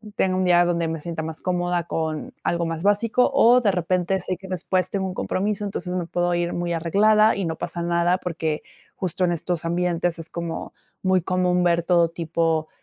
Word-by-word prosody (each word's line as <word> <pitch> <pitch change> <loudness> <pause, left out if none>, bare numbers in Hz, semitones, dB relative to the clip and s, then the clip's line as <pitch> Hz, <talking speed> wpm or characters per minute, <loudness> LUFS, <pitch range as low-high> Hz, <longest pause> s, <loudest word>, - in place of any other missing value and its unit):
tenga 185 -2 +1
un 185 - +1
día, 175 -1 +5
donde 170 -1 0
me 160 0 -3
sienta 165 +1 -5
más 160 0 -6
cómoda 175 -1 -1
con 160 -2 -3
algo 170 0 0
más 165 -1 -3
básico 210 +5 +2
o, 250 -2 +5
de 215 - +3
repente, 180 +1 0
sé 185 0 -4
que 190 - -11
después 185 0 -1
tengo 195 -1 -2
un 185 - -5
compromiso, 205 +2 -2
entonces, 190 -2 -4
me 175 -2 -2
puedo 175 0 0
ir 175 0 -1
muy 175 0 -2
arreglada, 210 +6 +4
y 195 - -2
no 160 -1 -3
pasa 170 - -4
nada, 170 +1 +2
porque, 160 -3 -3 0.3
justo 185 0 -2
en 175 - +2
estos 170 0 -2
ambientes 175 0 0
es 165 - -8
como 170 -1 -5 0.3
muy 185 -1 +3
común 180 0 +1
ver 170 -1 +2
todo 170 -1 +3
tipo 165 -1 -1
175 Hz, 200 wpm, -23 LUFS, 170-185 Hz, 0.3 s, día